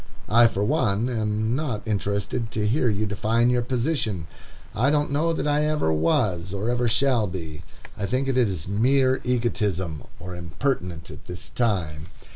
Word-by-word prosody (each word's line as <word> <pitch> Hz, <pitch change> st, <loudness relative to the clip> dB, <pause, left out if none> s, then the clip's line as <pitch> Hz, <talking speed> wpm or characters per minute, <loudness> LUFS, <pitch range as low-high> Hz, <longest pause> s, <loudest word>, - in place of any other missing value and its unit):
I, 115 Hz, +2 st, +7 dB
for 100 Hz, -3 st, -2 dB
one, 120 Hz, -3 st, +1 dB
am 110 Hz, -1 st, 0 dB
not 130 Hz, -8 st, -2 dB
interested 100 Hz, +2 st, -1 dB
to 105 Hz, -1 st, 0 dB
hear 125 Hz, +2 st, +2 dB
you 105 Hz, 0 st, 0 dB
define 110 Hz, +3 st, +1 dB
your 125 Hz, -1 st, +2 dB
position. 120 Hz, -, -1 dB, 0.5 s
I 125 Hz, +6 st, +2 dB
don't 145 Hz, -1 st, +1 dB
know 155 Hz, +4 st, +1 dB
that 160 Hz, -, -1 dB
I 150 Hz, +1 st, +2 dB
ever 150 Hz, -, +1 dB
was, 85 Hz, +3 st, +1 dB
or 105 Hz, +5 st, -1 dB
ever 120 Hz, 0 st, +1 dB
shall 120 Hz, -2 st, +2 dB
be. 80 Hz, -3 st, -6 dB, 0.3 s
I 100 Hz, -, -3 dB
think 130 Hz, +4 st, 0 dB
it 135 Hz, -, 0 dB
is 100 Hz, -11 st, +1 dB
mere 130 Hz, +6 st, +2 dB
egotism, 105 Hz, -10 st, -1 dB, 0.2 s
or 90 Hz, +1 st, -7 dB
impertinent 85 Hz, -, -3 dB
at -, -, -12 dB
this 90 Hz, 0 st, -7 dB
time. 85 Hz, -10 st, -1 dB
110 Hz, 165 wpm, -25 LUFS, 95-130 Hz, 0.5 s, I